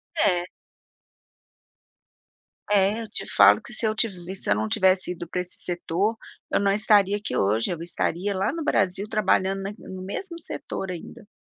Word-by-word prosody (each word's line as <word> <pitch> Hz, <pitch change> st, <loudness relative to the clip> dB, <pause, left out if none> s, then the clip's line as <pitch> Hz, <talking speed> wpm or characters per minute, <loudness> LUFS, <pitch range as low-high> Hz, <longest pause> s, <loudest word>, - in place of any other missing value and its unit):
É. 180 Hz, -, +2 dB, 2.2 s
É, 205 Hz, +2 st, +3 dB
eu 225 Hz, -, -6 dB
te -, -, -5 dB
falo -, -, +6 dB
que 240 Hz, -, -10 dB
se 220 Hz, -, -1 dB
eu 215 Hz, -, 0 dB, 0.4 s
se -, -, -5 dB
eu -, -, +5 dB
não 110 Hz, +1 st, -1 dB
tivesse 185 Hz, -, +2 dB
ido 175 Hz, -1 st, -6 dB
para 175 Hz, +2 st, -4 dB
esse 180 Hz, 0 st, -3 dB
setor, 180 Hz, +5 st, -1 dB, 0.3 s
eu -, -, +3 dB
não 200 Hz, -1 st, +2 dB
estaria 205 Hz, -1 st, +4 dB
aqui 210 Hz, +1 st, -4 dB
hoje, 105 Hz, -, +1 dB
eu 170 Hz, -2 st, -4 dB
estaria 175 Hz, +3 st, -2 dB
lá 190 Hz, +1 st, 0 dB
no 330 Hz, +3 st, -4 dB
Brasil 200 Hz, -6 st, +1 dB
trabalhando 195 Hz, -2 st, +1 dB
na 195 Hz, -, -3 dB, 0.2 s
no 190 Hz, 0 st, -7 dB
mesmo 335 Hz, -, -5 dB
setor 195 Hz, -, -5 dB
ainda. 205 Hz, +6 st, -9 dB
195 Hz, 170 wpm, -25 LUFS, 180-210 Hz, 2.2 s, falo